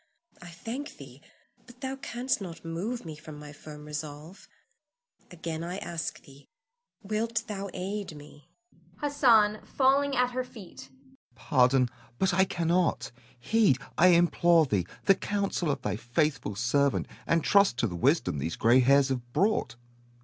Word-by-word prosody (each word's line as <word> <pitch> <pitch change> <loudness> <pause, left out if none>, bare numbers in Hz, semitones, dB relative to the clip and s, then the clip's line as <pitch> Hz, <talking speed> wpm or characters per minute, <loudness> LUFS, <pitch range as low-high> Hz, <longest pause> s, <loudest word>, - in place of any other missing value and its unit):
I 175 - -10
thank 230 - -7
thee; - - -13 0.5
but 245 0 -16
thou 265 0 -3
canst 260 -3 -2
not 170 -3 -8
move 185 +8 -4
me 160 -2 -7
from 150 0 -11
my 150 0 -10
firm 150 0 -11
resolve. 150 +3 -8 0.8
Again 165 -2 -5
I 175 +2 -4
ask 170 -4 -5
thee, 140 0 -17 0.6
Wilt 220 +2 -1
thou 200 -3 -5
aid 195 -1 -4
me? 145 0 -15 0.5
Hassan 230 -8 +3
[falling 275 +1 +2
at 250 0 +2
her 255 +1 -2
feet]. 220 -7 -12 0.5
Pardon, 130 -3 +3 0.3
but 190 +5 +1
I 190 +2 +4
cannot. 170 0 0 0.3
Heed, 200 - +3 0.2
I 180 - +5
implore 170 -1 +4
thee, 100 - -1 0.2
the 195 - +7
counsel 200 -4 -2
of 140 - -2
thy - - -2
faithful 120 -2 -1
servant, 135 +5 +1 0.2
and 165 -2 +2
trust 200 -11 +4
to 120 - +1
the 90 - -6
wisdom 130 - +1
these 80 +4 -3
gray 120 +3 +4
hairs 135 +2 +4
have 120 -2 -4
brought. 180 - +1
170 Hz, 150 wpm, -28 LUFS, 145-210 Hz, 0.8 s, the